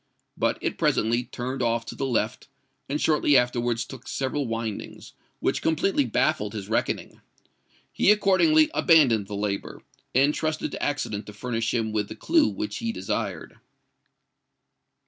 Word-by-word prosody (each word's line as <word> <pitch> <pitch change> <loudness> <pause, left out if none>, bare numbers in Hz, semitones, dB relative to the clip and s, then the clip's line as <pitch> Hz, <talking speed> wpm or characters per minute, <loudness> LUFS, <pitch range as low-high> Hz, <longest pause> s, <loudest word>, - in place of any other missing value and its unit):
But - - 0
it - - -3
presently 120 +3 +1
turned 130 +1 -5
off 115 -1 0
to - - -7
the 135 - -2
left, 110 -3 -1 0.4
and 145 +2 -1
shortly 150 -3 +3
afterwards 120 -1 0
took 130 -2 -11
several 135 0 -2
windings, 115 -2 -5 0.3
which - - 0
completely 160 -1 +1
baffled 105 -2 0
his 100 -3 -6
reckoning. 110 - -2 0.7
He - - +3
accordingly 300 - +4
abandoned 125 - +4
the 105 - -5
labour, 100 -1 -3 0.3
and 140 +3 +4
trusted 155 0 -2
to - - -6
accident 110 -8 -2
to 105 - -9
furnish 115 +1 -2
him 115 -2 -1
with 105 -1 -1
the - - -7
clue 320 -3 +3
which 320 -1 -4
he 230 -1 -2
desired. - - -4
125 Hz, 145 wpm, -25 LUFS, 110-155 Hz, 0.7 s, accordingly